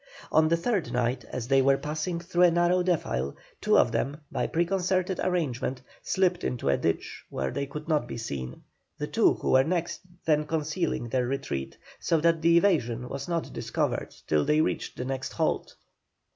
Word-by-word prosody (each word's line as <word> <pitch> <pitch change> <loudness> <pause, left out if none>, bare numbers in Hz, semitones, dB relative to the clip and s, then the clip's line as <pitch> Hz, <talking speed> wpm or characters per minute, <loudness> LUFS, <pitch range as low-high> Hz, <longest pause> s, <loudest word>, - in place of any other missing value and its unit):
On 155 0 +5
the 170 +1 +3
third 195 +1 -1
night, 125 +1 0
as 120 -2 -5
they 135 0 +4
were 135 +1 +4
passing 155 +4 -3
through 175 +1 -1
a - - +7
narrow 175 +2 +3
defile, 70 - -1 0.3
two - - +4
of 120 - +4
them, 130 +5 -1
by - - -1
preconcerted 185 +2 0
arrangement, 135 -8 -1 0.2
slipped 180 -2 +1
into 120 - -1
a 70 - +3
ditch - - -2
where 65 0 -2
they 140 - -3
could 150 +3 -7
not 150 -7 +1
be - - -6
seen, 65 - -5 0.3
the - - -2
two - - +3
who - - -2
were 130 0 +6
next 170 +2 -1 0.3
them 150 -1 +2
concealing 155 -5 -1
their 125 0 0
retreat 130 - -3 0.2
so 165 - +1
that 165 0 +2
the 170 +1 +5
evasion 125 - +1
was 140 0 -5
not 170 -2 -2
discovered - - -2 0.2
till 75 -1 +2
they 150 +1 +2
reached 155 - -1
the 125 - -3
next 130 0 -4
halt. - - -1
150 Hz, 185 wpm, -27 LUFS, 125-170 Hz, 0.3 s, a